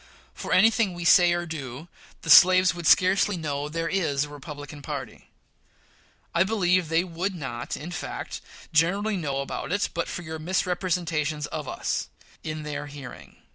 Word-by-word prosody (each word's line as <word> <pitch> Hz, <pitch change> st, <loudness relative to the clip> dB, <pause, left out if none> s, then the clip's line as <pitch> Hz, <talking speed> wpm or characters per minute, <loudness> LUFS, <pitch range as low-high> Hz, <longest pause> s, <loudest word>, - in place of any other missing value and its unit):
For -, -, -7 dB
any 225 Hz, -, +6 dB
thing 215 Hz, -6 st, 0 dB
we 175 Hz, -1 st, -6 dB
say 175 Hz, 0 st, +6 dB
or 175 Hz, 0 st, -1 dB
do, 145 Hz, -2 st, -7 dB, 0.4 s
the -, -, +1 dB
slaves 185 Hz, 0 st, +8 dB
would 170 Hz, -2 st, -4 dB
scarcely 190 Hz, +1 st, +4 dB
know 145 Hz, -2 st, -3 dB
there 165 Hz, +1 st, -2 dB
is 160 Hz, -7 st, 0 dB
a 150 Hz, -, -6 dB
Republican 145 Hz, 0 st, -9 dB
party. 140 Hz, -5 st, -7 dB, 1.0 s
I 170 Hz, -, +2 dB
believe 185 Hz, -5 st, +1 dB
they 165 Hz, +1 st, +2 dB
would 185 Hz, +2 st, -3 dB
not, 120 Hz, -7 st, -5 dB
in 165 Hz, +4 st, -7 dB
fact, 175 Hz, -, -6 dB, 0.3 s
generally 195 Hz, +7 st, +2 dB
know 140 Hz, -6 st, -2 dB
it 200 Hz, +8 st, -2 dB
but 170 Hz, 0 st, -2 dB
for 175 Hz, -, -5 dB
your 160 Hz, -1 st, -6 dB
misrepresentations 170 Hz, -3 st, -1 dB
of -, -, -6 dB
us -, -, -3 dB, 0.3 s
in 155 Hz, -1 st, -5 dB
their 150 Hz, 0 st, -5 dB
hearing. 140 Hz, -3 st, -11 dB
165 Hz, 160 wpm, -26 LUFS, 150-180 Hz, 1.0 s, slaves